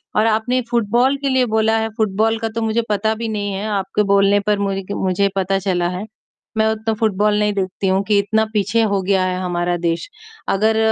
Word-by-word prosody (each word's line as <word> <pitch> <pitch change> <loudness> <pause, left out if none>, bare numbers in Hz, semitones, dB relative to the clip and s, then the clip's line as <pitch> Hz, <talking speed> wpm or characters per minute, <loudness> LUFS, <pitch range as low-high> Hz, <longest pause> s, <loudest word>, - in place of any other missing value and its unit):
और 215 - +3
आपने 225 +3 +1
फुटबॉल 240 +4 +2
के 275 0 -2
लिए 260 -1 +3
बोला 220 0 +3
है, 220 0 -1
फुटबॉल 220 +1 +1
का 225 -1 -2
तो 230 - -1
मुझे 225 +1 +1
पता 220 +1 +1
भी 230 +1 -4
नहीं 205 -2 -3
है 200 +2 -4
आपके 195 +2 -1
बोलने 200 +1 +4
पर 210 -1 +2
मु 200 -1 0 0.3
मुझे 190 +2 +1
पता 195 0 0
चला 180 -3 0
है। 200 - -5 0.5
मैं 220 - +3
उतना 220 0 -1
फुटबॉल 210 -1 +2
नहीं 210 0 +1
देखती 190 0 -2
हूँ 190 +1 +2
कि 205 0 +2
इतना 220 +2 +1
पीछे 210 +3 +1
हो 195 -1 +1
गया 190 0 +1
है 185 0 -1
हमारा 175 -1 -1
देश। 170 -1 -2 0.4
अगर 220 +3 +2
210 Hz, 210 wpm, -19 LUFS, 195-220 Hz, 0.5 s, बोलने